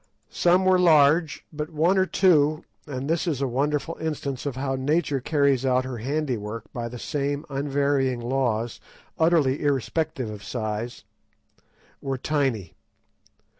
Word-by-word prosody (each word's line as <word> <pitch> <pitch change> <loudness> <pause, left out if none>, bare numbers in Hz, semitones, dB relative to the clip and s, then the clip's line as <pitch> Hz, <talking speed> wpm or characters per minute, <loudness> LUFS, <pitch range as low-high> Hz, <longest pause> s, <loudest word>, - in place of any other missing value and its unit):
Some 180 +2 +3
were 185 -1 +5
large, 155 -2 +4
but 150 +1 -4
one 165 +4 +2
or 190 0 +3
two—and 150 -6 +1
this 165 +3 0
is 150 -6 0
a 140 - 0
wonderful 145 +6 -1
instance 145 -4 -3
of 140 - -3
how 135 0 -2
nature 140 +1 0
carries 140 -2 +2
out 130 -1 +2
her 130 -3 -5
handiwork 120 -5 -3
by 120 -1 -4
the 125 - -8
same 145 +2 -2
unvarying 140 -2 0
laws, 120 -2 -1 0.4
utterly 160 -5 +3
irrespective 145 -2 -1
of 105 -1 -9
size—were 120 +4 -7
tiny. 130 - -1
140 Hz, 130 wpm, -25 LUFS, 125-155 Hz, 0.4 s, were